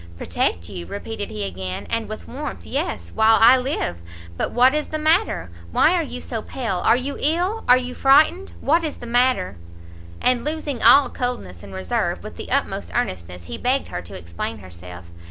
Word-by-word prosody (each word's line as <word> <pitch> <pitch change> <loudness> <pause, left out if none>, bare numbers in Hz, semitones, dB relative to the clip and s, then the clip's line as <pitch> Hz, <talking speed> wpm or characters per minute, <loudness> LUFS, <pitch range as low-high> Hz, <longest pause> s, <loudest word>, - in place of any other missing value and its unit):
"Protect 85 0 -1
you!" 85 - -7
repeated 205 0 -5
he 105 -1 -4
again, 95 -1 -5
and 230 -1 -2
with 215 - -7
warmth, 290 +3 -6
"yes, 300 +7 -3
while 220 0 +5
I 235 +3 +8
live! 255 - -1 0.4
but - - -1
what 255 +3 +4
is 300 0 0
the 310 - -3
matter? 315 - +1 0.2
why 320 - +4
are 355 - +2
you 250 -5 -6
so 225 -2 -4
pale? 225 -5 -3
are 225 - +4
you 260 +3 -3
ill? 355 +9 +1
are 250 - +8
you 250 0 -4
frightened? 305 +9 +4
what 330 +4 +2
is 310 - -3
the - - -9
matter?" 240 - +1 0.6
And 250 -1 +1
losing 300 -4 -3
all 270 +5 +7
coldness 245 - -4
and 100 - -11
reserve, 95 -1 -2
with - - -8
the - - -8
utmost - - -1
earnestness 90 0 -3
he 80 -2 -7
begged 265 +2 0
her 90 - -4
to 85 - -10
explain 85 +6 -5
herself. 90 -2 -11
240 Hz, 190 wpm, -22 LUFS, -, 0.6 s, I